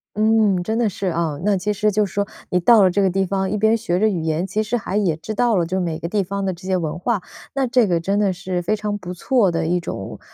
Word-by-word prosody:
嗯， 215 Hz, -3 st, +3 dB
真 220 Hz, +5 st, -2 dB
的 235 Hz, -1 st, +2 dB
是 195 Hz, 0 st, -4 dB
啊。 165 Hz, -4 st, -1 dB
那 205 Hz, -1 st, +2 dB
其 210 Hz, +3 st, -1 dB
实 210 Hz, +1 st, +1 dB
就 210 Hz, +1 st, +2 dB
是 195 Hz, -, -10 dB
说， 200 Hz, 0 st, 0 dB, 0.2 s
你 180 Hz, -, +2 dB
到 215 Hz, +4 st, +6 dB
了 185 Hz, -, +4 dB
这 200 Hz, -, +1 dB
个 195 Hz, -, +3 dB
地 190 Hz, +1 st, 0 dB
方， 190 Hz, 0 st, -1 dB
一 210 Hz, -, -1 dB
边 220 Hz, +2 st, +3 dB
学 215 Hz, -6 st, -1 dB
着 215 Hz, -, +3 dB
语 185 Hz, -6 st, -1 dB
言， 160 Hz, +2 st, -1 dB
其 200 Hz, +3 st, -1 dB
实 220 Hz, +3 st, -1 dB
还 200 Hz, -3 st, -5 dB
也 195 Hz, -6 st, +2 dB
知 215 Hz, +7 st, -6 dB
道 235 Hz, +1 st, +2 dB
了 175 Hz, -3 st, +2 dB
就 185 Hz, +3 st, -2 dB
是 -, -, 0 dB
每 165 Hz, -3 st, -2 dB
个 170 Hz, -, -5 dB
地 205 Hz, +3 st, 0 dB
方 195 Hz, +1 st, -3 dB
的 190 Hz, -, -1 dB
这 180 Hz, +2 st, -11 dB
些 190 Hz, -1 st, +1 dB
文 165 Hz, -1 st, -3 dB
化， 220 Hz, +3 st, 0 dB, 0.4 s
那 270 Hz, -1 st, +1 dB
这 245 Hz, -2 st, +3 dB
个 175 Hz, -2 st, +1 dB
真 195 Hz, +5 st, 0 dB
的 205 Hz, -2 st, +2 dB
是 180 Hz, 0 st, -3 dB
非 210 Hz, +5 st, 0 dB
常 210 Hz, -1 st, -3 dB
不 180 Hz, -2 st, -7 dB
错 205 Hz, +4 st, +2 dB
的 165 Hz, -1 st, -1 dB
一 175 Hz, +2 st, +1 dB
种 100 Hz, -, -6 dB
195 Hz, 320 characters per minute, -21 LUFS, 175-215 Hz, 0.4 s, 到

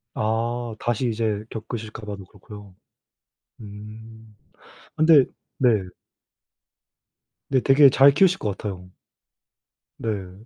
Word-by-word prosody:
아. 115 Hz, +1 st, -2 dB
다시 120 Hz, +1 st, -1 dB
이제 110 Hz, -2 st, -2 dB
겪으실까 110 Hz, -1 st, -7 dB
봐도 100 Hz, -2 st, -7 dB
그렇고요. 100 Hz, -1 st, -14 dB, 0.9 s
음. 110 Hz, +1 st, -12 dB, 0.6 s
근데 155 Hz, -3 st, +5 dB, 0.3 s
네. 125 Hz, -3 st, +3 dB, 1.8 s
근데 130 Hz, -2 st, +2 dB
되게 135 Hz, 0 st, +6 dB
잘 135 Hz, +2 st, +6 dB
키우실 190 Hz, +5 st, +3 dB
것 100 Hz, -2 st, -3 dB
같아요. 90 Hz, -3 st, -7 dB, 1.1 s
네. 100 Hz, -1 st, -5 dB
110 Hz, 185 characters per minute, -23 LUFS, 105-120 Hz, 1.8 s, 되게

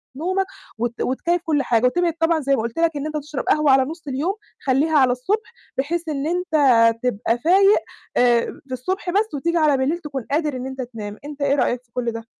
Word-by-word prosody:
نومك 375 Hz, +6 st, 0 dB, 0.3 s
وت 235 Hz, +1 st, -3 dB
وتكيّف 340 Hz, +7 st, 0 dB
كل 295 Hz, -3 st, +1 dB
حاجة 235 Hz, +1 st, +2 dB
وتبعد 340 Hz, +5 st, +2 dB
طبعًا 325 Hz, 0 st, +2 dB
زي 275 Hz, -1 st, +1 dB
ما 260 Hz, -, -1 dB
قُلت 230 Hz, +6 st, -4 dB
لك 335 Hz, 0 st, +3 dB
إن 285 Hz, -, -4 dB
أنت 310 Hz, 0 st, -3 dB
تشرب 295 Hz, -1 st, -5 dB
قهوة 305 Hz, -2 st, +4 dB
على 265 Hz, 0 st, +5 dB
نُص 320 Hz, +1 st, -8 dB
اليوم 285 Hz, +8 st, -1 dB, 0.3 s
خلّيها 285 Hz, +4 st, +2 dB
على 260 Hz, -3 st, +5 dB
الصُبح، 415 Hz, -, -2 dB, 0.2 s
بحيث 325 Hz, +5 st, -1 dB
إن 290 Hz, -1 st, -2 dB
أنت 355 Hz, 0 st, -2 dB, 0.5 s
تبقى 230 Hz, -1 st, 0 dB
فايق 390 Hz, -, +5 dB, 0.4 s
آآ 240 Hz, -1 st, +4 dB, 0.2 s
في 260 Hz, -, -6 dB
الصبح 365 Hz, -, -3 dB
بس 415 Hz, +4 st, +1 dB
وتيجي 335 Hz, +4 st, 0 dB
على 305 Hz, -4 st, +3 dB
بليل 270 Hz, +6 st, 0 dB
تكون 275 Hz, -7 st, -6 dB
قادر 300 Hz, -2 st, 0 dB
إن 255 Hz, 0 st, -5 dB
أنت 265 Hz, 0 st, -5 dB
تنام، 215 Hz, -4 st, -7 dB
أنت 295 Hz, -1 st, -8 dB
إيه 280 Hz, 0 st, +2 dB
رأيك 250 Hz, -3 st, 0 dB
في 235 Hz, -, -38 dB
كل 240 Hz, -2 st, -1 dB
ده؟ 230 Hz, 0 st, -7 dB
285 Hz, 215 wpm, -22 LUFS, 250-335 Hz, 0.5 s, على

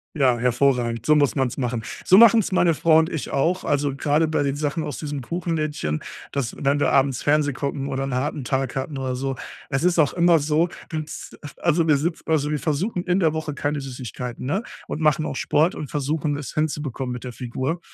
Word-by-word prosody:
Ja, 130 Hz, -5 st, +3 dB
hervorragend. 120 Hz, -2 st, +1 dB
So 150 Hz, -, +5 dB
muss 145 Hz, -2 st, +3 dB
man's 130 Hz, -4 st, 0 dB
machen. 120 Hz, -3 st, -2 dB, 0.2 s
So 185 Hz, -, +6 dB
machen's 225 Hz, -2 st, +6 dB
meine 175 Hz, -2 st, +3 dB
Frau 160 Hz, +1 st, +4 dB
und 160 Hz, +1 st, +3 dB
ich 160 Hz, -, -4 dB
auch. 175 Hz, +7 st, 0 dB
Also, 145 Hz, -1 st, 0 dB
gerade 150 Hz, +3 st, +2 dB
bei 155 Hz, -, 0 dB
den 140 Hz, -1 st, 0 dB
Sachen 150 Hz, +2 st, -2 dB
aus 145 Hz, -, -5 dB
diesem 145 Hz, -3 st, -4 dB
Kuchenlädchen, 155 Hz, -, -2 dB, 0.3 s
dass 135 Hz, -5 st, -2 dB
wenn 140 Hz, +1 st, +1 dB
wir -, -, +2 dB
abends 135 Hz, -2 st, +2 dB
Fernseh 145 Hz, -1 st, +2 dB
gucken 140 Hz, 0 st, -3 dB
oder 135 Hz, 0 st, -2 dB
'n 135 Hz, -2 st, -3 dB
harten 145 Hz, +1 st, -2 dB
Tag 130 Hz, 0 st, -1 dB
hatten 135 Hz, +2 st, -3 dB
oder 130 Hz, -1 st, -2 dB
so. 135 Hz, +1 st, -2 dB, 0.3 s
Es 135 Hz, +2 st, -1 dB
ist 175 Hz, -1 st, +3 dB
auch 145 Hz, -, +3 dB
immer 170 Hz, -1 st, +4 dB
so, 155 Hz, +3 st, +2 dB, 0.2 s
dass 155 Hz, -1 st, -6 dB, 0.2 s
also 170 Hz, -1 st, +2 dB
wir 150 Hz, -, +5 dB
sitz 160 Hz, +4 st, -2 dB
also 150 Hz, -2 st, +1 dB
wir 150 Hz, -, 0 dB
versuchen 175 Hz, +5 st, -1 dB
in 180 Hz, +1 st, +1 dB
der 160 Hz, -4 st, +2 dB
Woche 155 Hz, -1 st, -3 dB
keine 145 Hz, 0 st, -2 dB
Süßigkeiten, 125 Hz, -2 st, -6 dB
ne? 195 Hz, -, 0 dB, 0.2 s
Und -, -, -4 dB
machen 155 Hz, 0 st, +2 dB
auch -, -, -4 dB
Sport 155 Hz, +6 st, +2 dB
und 145 Hz, -, -6 dB
versuchen 145 Hz, +1 st, -1 dB
es 145 Hz, -4 st, -6 dB
hinzubekommen 145 Hz, -4 st, -2 dB
mit 125 Hz, -, -7 dB
der 125 Hz, -1 st, -6 dB
Figur. 130 Hz, +7 st, -3 dB
145 Hz, 210 wpm, -23 LUFS, 135-160 Hz, 0.3 s, So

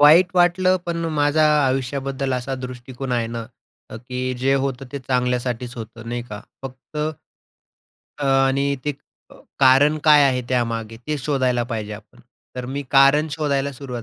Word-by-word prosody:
वाईट 165 Hz, +5 st, +7 dB
वाटलं, 185 Hz, +1 st, +4 dB
पण 170 Hz, -1 st, -2 dB
माझा 150 Hz, +1 st, +3 dB, 0.2 s
आयुष्याबद्दल 135 Hz, +1 st, -2 dB
असा 125 Hz, +2 st, -3 dB
दृष्टिकोन 130 Hz, 0 st, -6 dB
आहे 120 Hz, -2 st, 0 dB
ना 115 Hz, -1 st, -5 dB, 0.4 s
अ, 110 Hz, -, -7 dB
की 125 Hz, +2 st, -4 dB
जे 135 Hz, +2 st, +2 dB
होतं 135 Hz, 0 st, -4 dB
ते 140 Hz, -, -3 dB
चांगल्यासाठीच 125 Hz, -1 st, -1 dB
होतं, 115 Hz, 0 st, -9 dB
नाही 120 Hz, 0 st, -3 dB
का? 105 Hz, 0 st, -7 dB, 0.2 s
फक्त, 130 Hz, +3 st, -10 dB, 1.2 s
अ, 145 Hz, -, -3 dB
आणि 135 Hz, +1 st, +2 dB
ते 150 Hz, -, 0 dB, 0.4 s
अ, -, -, -15 dB, 0.2 s
कारण 140 Hz, +3 st, +5 dB
काय 150 Hz, -2 st, +7 dB
आहे 130 Hz, -2 st, +2 dB
त्यामागे, 115 Hz, -3 st, -1 dB
ते 150 Hz, -, -1 dB
शोधायला 130 Hz, -3 st, 0 dB
पाहिजे 110 Hz, -3 st, -4 dB
आपण. 105 Hz, +3 st, -12 dB, 0.4 s
तर 125 Hz, -, -4 dB
मी 140 Hz, +3 st, -4 dB
कारण 140 Hz, +3 st, +5 dB
शोधायला 140 Hz, -2 st, -1 dB
सुरुवात 125 Hz, -3 st, -7 dB
130 Hz, 155 wpm, -21 LUFS, 125-140 Hz, 1.2 s, वाईट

